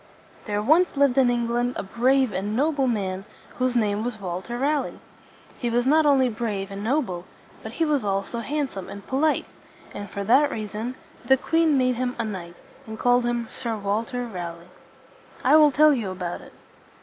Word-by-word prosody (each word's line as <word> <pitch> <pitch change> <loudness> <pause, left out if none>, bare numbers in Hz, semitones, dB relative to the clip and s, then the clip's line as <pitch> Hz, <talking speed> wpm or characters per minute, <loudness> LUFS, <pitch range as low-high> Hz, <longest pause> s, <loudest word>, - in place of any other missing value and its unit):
There 205 0 -1
once 315 +6 +3
lived 275 -2 +4
in 255 -2 +5
England 240 +1 0
a - - -3
brave 250 +3 +2
and 205 +3 -2
noble 285 0 +1
man 195 -5 -2 0.4
whose 255 -1 +1
name 210 -2 +1
was 240 -2 -4
Walter 190 +5 -5
Ra 290 +4 +2
leigh. - - -8 0.6
He 240 - -1
was 240 +1 +1
not 305 +3 +4
only 270 -3 +4
brave 215 -4 -3
and 200 +1 -6
noble, 220 - -1 0.4
but - - -8
he 330 - +1
was 295 -5 +1
also 195 +3 -2
handsome 265 -6 -3
and 200 - -9
polite; 295 +4 +1 0.5
and 205 -1 -7
for 200 +1 -4
that 270 +8 +4
reason 215 +2 -4 0.3
the 265 - +4
queen 325 +1 +2
made 255 -2 +2
him 250 0 -2
a - - -1
knight, 175 -5 -6 0.3
and 220 0 -7
called 245 +1 +3
him 240 -1 -1
Sir 230 -4 -3
Walter 225 +5 -2
Ra 180 -7 -5
leigh. 170 +1 -16 0.7
I - - +5
will 305 -1 +7
tell 300 +2 +5
you 230 -7 -2
about 180 -2 -5
it. - - -15
240 Hz, 185 wpm, -24 LUFS, 205-270 Hz, 0.7 s, will